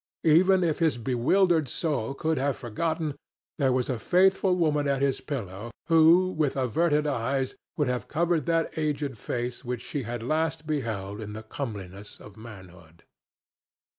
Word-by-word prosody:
Even 180 +4 +5
if 160 -3 0
his 160 -7 +2
bewildered 145 - +2
soul 140 -6 -2
could 160 +1 -1
have 140 0 0
forgotten, 155 +6 -2 0.5
there 135 -2 +3
was 125 -1 0
a 125 -4 -2
faithful 190 - +3
woman 150 -4 +1
at 140 -1 +1
his 135 -1 0
pillow 110 -6 -5 0.2
who 165 +3 +6
with 155 -5 0
averted 150 +4 +1
eyes 135 -1 -1 0.2
would 150 - +1
have 125 -1 -2
covered 165 -1 0
that 165 -1 0
aged 145 -3 -1
face 120 +3 -4
which 125 -1 -4
she 145 - -4
had 120 -1 -5
last 155 +3 -1
beheld 110 -9 -3
in 105 -1 -7
the 110 +1 -7
comeliness 105 -5 -7
of 105 -2 -13
manhood. 90 -7 -13
140 Hz, 155 wpm, -27 LUFS, 115-160 Hz, 0.5 s, who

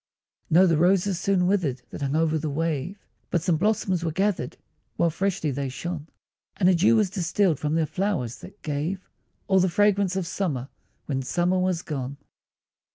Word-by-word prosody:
No, 180 +4 +6
the 165 -4 +3
roses 185 +1 +3
soon 190 -2 +2
withered 160 -10 0
that - - -7
hung 140 +1 -1
o'er 160 0 +2
the 155 0 -2
wave, 165 +4 -2 0.2
But 170 - 0
some 175 -3 +2
blossoms 195 -2 +1
were 165 - 0
gathered, 190 -7 -1 0.4
while 170 - +2
freshly 185 -3 -1
they 135 0 -2
shone, 160 +3 -5 0.5
And 180 - +3
a 185 - +6
dew 180 +6 +4
was 210 -4 +2
distilled 180 -3 +1
from 150 +1 -1
their 165 -1 +2
flowers, 170 - -2
that 205 - -13
gave 160 +5 -3 0.4
All 190 -1 +4
the 185 0 +3
fragrance 200 0 +2
of 190 -2 -1
summer, 150 -8 -2 0.4
when 135 -2 -2
summer 175 +7 +1
was 185 -2 0
gone. 140 -2 -4
175 Hz, 175 wpm, -25 LUFS, 150-190 Hz, 0.5 s, No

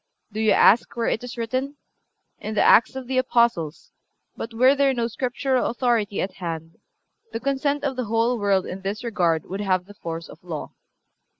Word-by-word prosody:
Do 215 - -5
you 220 0 +2
ask 225 +4 +4
where 235 -1 -1
it 225 - -2
is 245 0 -7
written? 255 +5 -2 0.6
In 215 0 -5
the - - +3
Acts 235 - +5
of 265 -1 -5
the 255 +1 0
Apostles; 235 - 0 0.4
but 230 - -6
were 255 +4 +5
there 280 -1 +2
no 235 -1 0
Scriptural 255 +2 -1
authority 230 -5 0
at 190 - -4
hand 165 -2 -6 0.5
the - - -3
consent 280 +2 -1
of 275 -2 -1
the 250 -1 -2
whole 230 +2 +1
world 195 -2 +2
in 190 +1 -6
this 200 +4 -4
regard 175 -9 0
would 195 +3 -5
have 185 -3 0
the 205 - -13
force 165 -3 -6
of 165 - -14
law." 165 -4 -6
225 Hz, 190 wpm, -24 LUFS, 190-255 Hz, 0.6 s, Acts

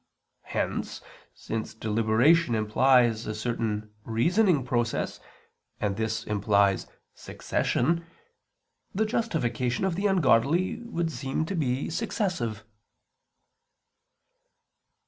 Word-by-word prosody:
Hence, - - -3 0.3
since 110 0 -5
deliberation 115 +7 +3
implies 115 +1 +3
a 110 - -3
certain 110 -2 -3
reasoning 160 - +2
process, 120 -3 -1 0.6
and 100 -2 -1
this 110 +1 -2
implies 100 -1 +2 0.3
succession, 165 +6 -1 0.9
the 220 +3 +2
justification 160 - -1
of 190 - 0
the 195 +4 0
ungodly 165 - +2
would 170 -8 -2
seem 140 +2 -2
to 195 - -4
be 135 -4 -1
successive. 170 - -2
125 Hz, 90 wpm, -27 LUFS, 110-170 Hz, 0.9 s, deliberation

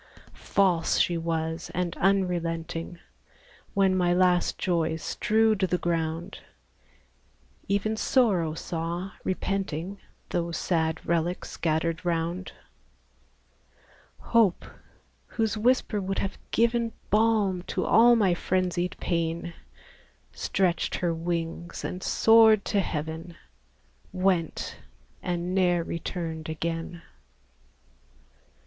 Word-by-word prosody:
False 180 -4 +1
she 175 - +2
was, 165 0 -2
and 180 -2 -1
unrelenting; 175 -3 0 0.8
When 195 -1 +3
my 175 -1 +2
last 180 -1 +3
joys 165 -2 0
strewed 220 -1 +2
the 185 -2 +1
ground, 165 -1 -2 1.3
Even 200 +2 0
Sorrow 195 - +2
saw, 170 +3 -4
repenting, 190 -1 -2 0.3
Those 170 -1 -2
sad 160 -2 -1
relics 170 +1 -1
scattered 165 +1 -1
round; 170 +1 -2 1.6
Hope, 225 -6 +2 0.6
whose 225 -2 -1
whisper 220 -2 +1
would 195 0 -3
have 195 - -3
given 235 -1 +1 0.2
Balm 210 -4 +3
to - - -1
all 235 +2 +6
my 200 -6 +3
frenzied 180 0 -1
pain, 170 0 -2 0.8
Stretched 180 -3 0
her 175 -2 0
wings, 170 0 -4
and 180 - -4
soared 220 -1 +5
to 205 - +1
heaven, 160 0 -4 0.7
Went, 185 -3 0 0.4
and 175 0 -2
ne'er 175 -2 +2
returned 165 -2 -5
again! 165 +1 -4
175 Hz, 95 wpm, -27 LUFS, 165-195 Hz, 1.6 s, all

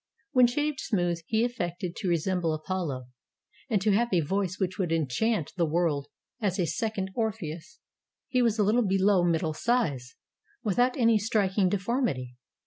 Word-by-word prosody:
When 255 -4 +6
shaved 295 +3 -1
smooth, 175 -5 0
he 220 +1 +2
affected 180 -7 -4
to 195 - -3
resemble 170 -1 +1
Apollo, 155 -6 -3 0.6
and 215 -4 +2
to 215 - +3
have 230 +4 +3
a 180 -3 +3
voice 185 +3 -1
which 185 -1 -2
would 180 -4 0
enchant 165 - 0
the 170 - +3
world 155 -3 0 0.3
as 195 -3 0
a 180 - +1
second 200 0 -2
Orpheus. 220 - -4 0.5
He 255 - +1
was 230 -2 +2
a 210 - +3
Uttle 215 +2 +2
below 195 -1 +3
middle 165 -2 +1
size, 155 - -1 0.5
without 245 +5 +2
any 230 -3 +4
striking 200 -3 +1
deform 235 +7 0
ity. 125 - -5
190 Hz, 160 wpm, -28 LUFS, 170-225 Hz, 0.6 s, When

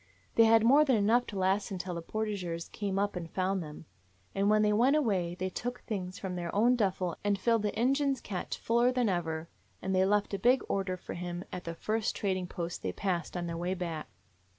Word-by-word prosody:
"They 230 - +6
had 225 0 +6
more 275 +6 +6
than 270 -4 +3
enough 225 +4 +3
to 205 - -6
last 190 +2 +1
until 185 -2 -4
the 170 - -4
portageurs 185 -4 -3
came 200 -2 -2
up 200 0 0
and 170 -2 -5
found 190 +2 0
them. 150 0 -9 0.5
And 200 +1 +2
when 215 0 +4
they 210 0 +3
went 250 +7 +4
away 190 - +1
they 185 +1 -3
took 245 +5 -4
things 185 -4 -4
from 190 -2 -4
their 175 -1 -3
own 235 +4 +4
duffel 185 -6 0
and 205 -1 +2
filled 230 +3 +2
the 210 +1 -2
Injun's 275 +2 +2
cache 190 -3 -4
fuller 235 +2 +2
than 250 -3 +1
ever, 165 -3 -2 0.3
and 190 - -2
they 185 0 +4
left 205 +1 +1
a 200 - -1
big 250 +6 +4
order 190 -2 -1
for - - -8
him 175 0 -5
at 180 - -5
the 165 0 -4
first 215 +4 -1
trading 185 -3 -1
post 170 -1 -5
they 95 - -2
passed 180 - -2
on 175 - -2
their 170 -1 -3
way 180 +2 -1
back. 170 -4 -4
195 Hz, 220 wpm, -31 LUFS, 180-220 Hz, 0.5 s, They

